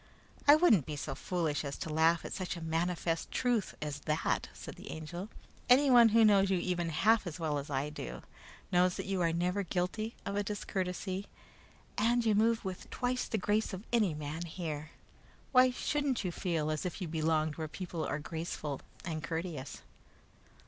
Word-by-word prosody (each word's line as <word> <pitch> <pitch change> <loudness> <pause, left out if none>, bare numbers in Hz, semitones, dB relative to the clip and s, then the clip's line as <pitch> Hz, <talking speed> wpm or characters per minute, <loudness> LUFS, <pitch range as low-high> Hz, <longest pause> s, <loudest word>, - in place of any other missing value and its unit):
"I 290 - +10
wouldn't 230 - +4
be 155 - -3
so 145 - -4
foolish 165 -5 -1
as 140 -1 -4
to 155 - -4
laugh 160 +2 +3
at - - -5
such 185 -1 -3
a - - -7
manifest 165 0 -1
truth 240 -6 0
as 145 -1 -4
that," 155 +1 0
said - - -9
the - - -11
Angel. 175 +5 -6 0.4
"Anyone 250 -3 +7
who 225 +1 +6
knows 200 -2 +5
you 190 - +3
even 175 -1 -1
half 210 +6 +3
as 175 +1 -5
well 155 -3 0
as 140 - -7
I 140 +1 -1
do, - - -7 0.5
knows 180 0 +4
that - - -4
you 195 -1 -1
are 165 -1 +3
never 180 +4 0
guilty 190 +5 -2
of 200 - -2
a 205 - +2
discourtesy, 190 -1 -3 0.7
and 235 +2 +3
you 220 - +4
move 225 +1 +2
with 185 -1 -5
twice 250 0 -1
the 220 - -1
grace 210 +2 0
of 190 +2 -5
any 210 -9 +3
man 155 +3 -4
here. 155 -3 -5 0.6
Why 255 -1 +7
shouldn't 275 0 -1
you 180 - -1
feel 165 -4 -1
as 155 - -2
if 180 - -4
you 180 - -3
belonged 155 -1 0
where 160 -1 -3
people 170 0 -5
are - - -1
graceful 155 -2 -4 0.2
and 160 -3 -3
courteous?" 165 -4 -4
180 Hz, 185 wpm, -32 LUFS, 160-210 Hz, 0.7 s, I